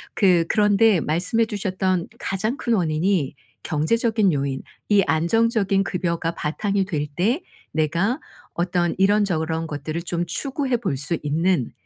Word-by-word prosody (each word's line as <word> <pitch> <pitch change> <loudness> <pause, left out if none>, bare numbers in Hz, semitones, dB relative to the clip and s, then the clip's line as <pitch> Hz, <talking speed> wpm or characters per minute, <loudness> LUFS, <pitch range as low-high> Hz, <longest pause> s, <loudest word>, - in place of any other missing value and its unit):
그 180 -5 +4
그런데 210 -1 +4
말씀해 180 +9 +1
주셨던 185 -4 -1
가장 215 +7 -2
큰 235 - -1
원인이 165 -4 +1 0.3
경제적인 215 +5 +1
요인 135 -2 -2 0.2
이 205 -2 +4
안정적인 195 - +2
급여가 170 -3 -1
바탕이 195 +6 -1
될 155 -6 -2
때 235 - +1 0.3
내가 170 - 0 0.3
어떤 175 0 0
이런저런 165 -6 +1
것들을 155 +3 -4
좀 170 0 -2
추구해 265 - -1
볼 190 - -2
수 150 +4 0
있는 160 -1 0
185 Hz, 275 characters per minute, -23 LUFS, 160-210 Hz, 0.3 s, 그